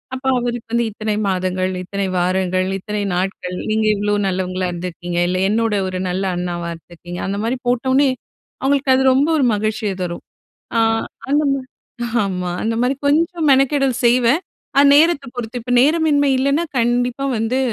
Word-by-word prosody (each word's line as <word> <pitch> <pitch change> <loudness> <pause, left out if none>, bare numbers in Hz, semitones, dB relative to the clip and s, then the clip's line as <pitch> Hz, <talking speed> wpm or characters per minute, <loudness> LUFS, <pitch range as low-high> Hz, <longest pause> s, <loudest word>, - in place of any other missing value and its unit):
அப்ப 260 - -8 0.2
அவருக்கு 240 -1 -4
வந்து 235 0 +2
இத்தனை 215 0 -3
மாதங்கள், 185 0 -1
இத்தனை 200 +1 -3
வாரங்கள், 185 +1 0
இத்தனை 210 +2 -4
நாட்கள், 180 -1 -3
நீங்க 215 0 +1
இவ்வளோ 205 0 -1
நல்லவங்களா 185 0 -2
இருந்திருக்கீங்க, 175 0 -5
இல்ல 185 +1 -1
என்னோட 225 0 +1
ஒரு 185 0 -4
நல்ல 185 +2 -2
அண்ணாவா 175 -1 -3
இருந்திருக்கீங்க, 175 +1 -10
அந்த 200 +1 -2
மாரி 240 +3 -1
போட்டவோனே, 260 +3 +2 0.5
அவுங்களுக்கு 275 -1 +2
அது 265 - +2
ரொம்ப 275 +3 +3
ஒரு 270 - +3
மகிழ்ச்சியை 215 -1 -1
தரும். 175 -1 -5 0.6
ஆ - - +5 0.5
அந்தமா 285 -2 +2 0.6
ஆமா, 180 -2 -3
அந்த 225 +1 0
மாரி 250 +2 +1
கொஞ்சம் 330 +3 +1
மெனக்கெடல் 275 0 +3
செய்வேன் 245 +5 +4 0.4
அ - - +7
நேரத்த 300 -1 +4
பொறுத்து. 245 0 -5
இப்ப 245 - -3
நேரமின்மை 295 -1 +3
இல்லைன்னா, 280 +5 +1
கண்டிப்பா 245 +3 0
வந்து, 225 +4 0
225 Hz, 150 wpm, -19 LUFS, 185-265 Hz, 0.6 s, அ